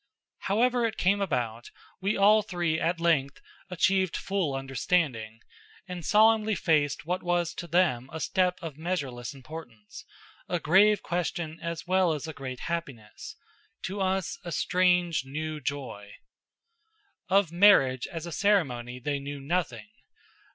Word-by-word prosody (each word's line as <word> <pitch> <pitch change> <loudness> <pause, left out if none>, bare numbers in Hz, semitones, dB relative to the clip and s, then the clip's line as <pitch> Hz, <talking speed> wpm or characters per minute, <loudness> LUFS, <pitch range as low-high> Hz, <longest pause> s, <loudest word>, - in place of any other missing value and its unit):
However 240 +4 +1
it 220 - -6
came 200 +2 +2
about, 120 - -2 0.3
we 200 +2 0
all 210 +2 +6
three 175 -5 -1
at 170 +1 0
length 145 -5 +1 0.3
achieved 185 0 +1
full 190 -8 -1
understanding, 135 -4 -1 0.5
and 180 -2 -6
solemnly 215 +2 +4
faced 150 -5 +1
what 180 +2 -2
was 175 -1 0
to 175 - -7
them 155 -8 +1
a 160 - -6
step 180 +1 +1
of 155 -3 -7
measureless 140 -9 -3
importance, 130 -6 -11 0.5
a 175 - 0
grave 200 +6 +4
question 170 -2 -3
as 170 0 -5
well 185 -2 +2
as 150 +1 -5
a 160 - -6
great 130 -3 -7
happiness; 140 -11 -6 0.5
to 195 +2 -4
us 190 -1 -1
a 175 - -6
strange, 180 -2 +2
new 155 +3 -5
joy. 125 -7 -5 1.1
Of 195 -3 +3
marriage 170 -9 +5
as 165 -1 -6
a 170 - -6
ceremony 130 - 0
they 140 +2 -2
knew 140 +1 -6
nothing. 175 +9 -2
170 Hz, 135 wpm, -28 LUFS, 140-185 Hz, 1.1 s, all